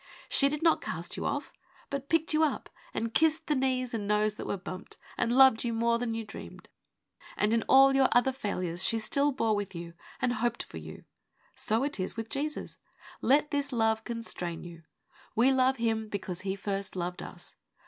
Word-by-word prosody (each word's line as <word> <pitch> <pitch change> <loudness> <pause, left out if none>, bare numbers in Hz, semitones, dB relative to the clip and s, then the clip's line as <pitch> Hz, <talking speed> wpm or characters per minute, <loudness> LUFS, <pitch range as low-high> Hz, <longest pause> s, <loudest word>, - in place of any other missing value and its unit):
She 275 - +3
did 300 +2 -3
not 330 - +4
cast - - -4
you - - -2
off, - - -3 0.4
but 280 0 -4
picked 325 -1 +1
you 310 - +3
up, 305 - -1 0.2
and 230 0 -3
kissed 320 0 +3
the 300 - +1
knees 255 -2 0
and 210 -3 -2
nose 210 0 +2
that - - -7
were - - -1
bumped, 185 0 -8 0.2
and 235 - 0
loved 265 -4 +7
you 235 -1 -1
more 235 +1 +2
than 230 -2 -2
you 225 -1 -4
dreamed. 205 - -10 0.7
And 210 +1 +2
in 230 - +3
all 270 +1 +7
your 270 -1 +5
other 245 +2 +4
failures 185 -8 -2
she 225 +4 +3
still 280 +6 +2
bore 225 -5 +1
with 205 -2 -4
you 170 0 -7 0.3
and 245 - +1
hoped 235 +1 -1
for - - -10
you. - - -10 0.5
So 225 +4 0
it 285 -6 -3
is 185 +4 -3
with 225 0 -4
Jesus. 300 +4 -4 0.4
Let 295 +3 +3
this 285 0 -1
love 225 -2 +1
constrain 220 -8 -4
you. 170 -1 -10 0.5
'We 240 +4 +5
love 260 0 +3
Him 225 -2 0
because 190 -3 -4
He 190 0 -2
first 200 0 -3
loved 180 0 -3
us. - - -9
230 Hz, 200 wpm, -30 LUFS, 205-270 Hz, 0.7 s, loved